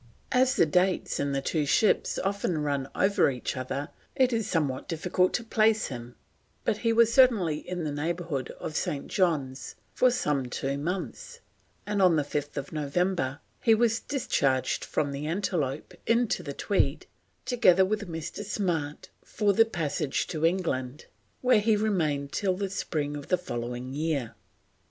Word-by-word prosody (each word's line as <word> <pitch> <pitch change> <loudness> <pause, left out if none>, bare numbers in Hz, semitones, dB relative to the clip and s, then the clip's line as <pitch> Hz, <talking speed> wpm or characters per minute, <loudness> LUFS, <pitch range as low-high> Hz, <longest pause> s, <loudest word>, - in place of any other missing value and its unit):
As 255 0 +3
the - - +5
dates 180 +4 +1
in 140 0 0
the 135 0 -1
two 155 +1 0
ships 210 +8 +2
often 190 -5 -1
run 140 -2 -1
over 200 -4 +3
each 125 0 -3
other 135 +3 -4 0.3
it 255 -2 +3
is 225 -2 -1
somewhat 145 -6 -1
difficult 180 +2 +1
to 240 - -1
place 220 -1 +2
him, 120 -2 -8 0.5
but 210 - +1
he 230 +1 +1
was 230 0 +4
certainly 210 - +4
in 180 -2 -3
the 150 - -2
neighbourhood 160 -2 -3
of 155 - -5
St. 140 - -2
John's 145 -9 -1 0.2
for 255 - +4
some 150 - 0
two 135 +2 -2
months, 190 - -5 0.4
and 205 -1 0
on 180 -3 +5
5th 145 -1 -2
November 155 -1 -1 0.2
he 225 -2 +5
was 225 0 +2
discharged 135 - 0
from 145 -2 -1
the 140 +2 -4
Antelope 160 -6 -2
into 230 0 +2
the - - -6
Tweed, - - 0 0.4
together 190 -7 +5
with 205 -1 -2
Mr. 165 +5 -5
Smart, 170 -8 -2
for 205 -2 +1
the 225 +3 +5
passage 155 -8 -1
to 155 -2 -4
England, 150 -7 -2 0.4
where 250 -4 +5
he 215 +1 +3
remained 160 -10 0
till 190 -2 0
the 195 -1 -3
spring 150 -6 -2
of 145 -1 -7
the 180 - +2
following 125 -5 -5
year. 145 -6 -1
170 Hz, 155 wpm, -28 LUFS, 140-205 Hz, 0.5 s, the